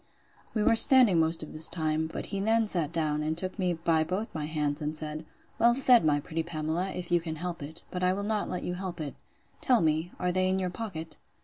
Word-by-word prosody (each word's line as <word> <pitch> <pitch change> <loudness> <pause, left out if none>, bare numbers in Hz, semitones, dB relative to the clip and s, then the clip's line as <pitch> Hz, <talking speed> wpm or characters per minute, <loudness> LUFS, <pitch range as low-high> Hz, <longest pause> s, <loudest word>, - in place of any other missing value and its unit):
We 215 - +1
were 230 - +4
standing 235 - +7
most 160 0 +2
of 155 - -10
this 155 +1 +1
time; 160 -2 0
but - - -6
he 200 - -1
then 225 +3 +2
sat 170 -7 0
down, 155 -3 -1
and 155 +1 -2
took 185 +3 +1
me 180 -2 +1
by 165 -1 +1
both 190 +8 -4
my 150 -2 -4
hands, 150 -1 -2
and 150 +1 -3
said, 155 0 -2 0.3
Well 235 +1 +4
said, 255 -2 +5
my 150 -2 +2
pretty 160 +3 -4
Pamela, 160 +2 -3
if 180 -2 -6
you 175 -1 +3
can 160 -1 -5
help 170 +1 -5
it! 155 +4 -6
But 180 0 -4
I 180 - +3
will 200 +1 -4
not 210 0 -2
let 180 - -4
you 180 - -3
help 180 -1 -6
it. 150 -3 -5 0.5
Tell 250 -3 +3
me, 160 +2 0
are 180 - 0
they 185 +1 +1
in 190 - +1
your 185 -2 -2
pocket? 165 -7 -7
170 Hz, 240 wpm, -28 LUFS, 155-190 Hz, 0.5 s, standing